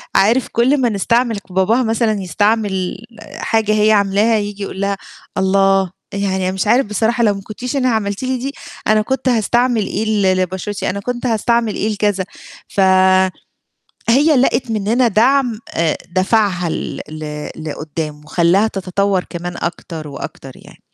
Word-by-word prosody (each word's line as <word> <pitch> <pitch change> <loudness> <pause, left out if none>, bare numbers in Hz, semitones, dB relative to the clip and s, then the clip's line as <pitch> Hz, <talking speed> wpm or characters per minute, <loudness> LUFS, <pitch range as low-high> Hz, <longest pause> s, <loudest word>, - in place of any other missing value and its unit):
عارف 230 +6 +3
كُل 260 +4 +2
ما 240 - +3
نستعمل 230 +2 +1
باباها 190 +7 +2
مثلًا 225 -3 0
يستعمل 200 0 0 0.4
حاجة 220 -1 0
هي 215 0 +4
عاملاها 205 +2 +3
ييجي 205 -1 -4
يقول 195 0 -5
لها: 200 0 0 0.4
"الله! 195 -1 +3 0.2
يعني 200 -1 -1
أنا - - -1
مش 190 +2 -2
عارف 245 +3 +4
بصراحة 225 +3 0
لو 210 - +4
ما 195 - -7
كنتيش 245 +7 -5
أنا 255 -2 +2
عملتِ 205 -1 -1
لي 260 0 -1
دي 265 +3 -4 0.4
أنا 215 0 +4
كنت 265 +3 -1
هاستعمل 240 -1 +2
إيه 220 - -2
ل 200 -4 +2
لبشرتي، 190 +3 -3
أنا 200 - -3
كنت 245 +4 -4
هاستعمل 230 -1 +1
إيه 215 - -1
لكذا." 205 -2 0 0.4
ف - - -5 1.3
هي 290 +6 +5
لقِت 250 -1 +1
مننا 225 +4 +2
دعم 240 +1 +2
آآ 165 -2 +1
دَفَعها 185 -2 +1
ل - - -4
ل 150 -1 -6
لقدّام، 155 -1 -5
وخلّاها 175 +6 +3
تتطور 195 -1 -1
كمان 175 0 -5
أكتر 165 -2 -5
وأكتر 135 -1 -8
يعني. - - -16
205 Hz, 150 wpm, -17 LUFS, 190-230 Hz, 1.3 s, هي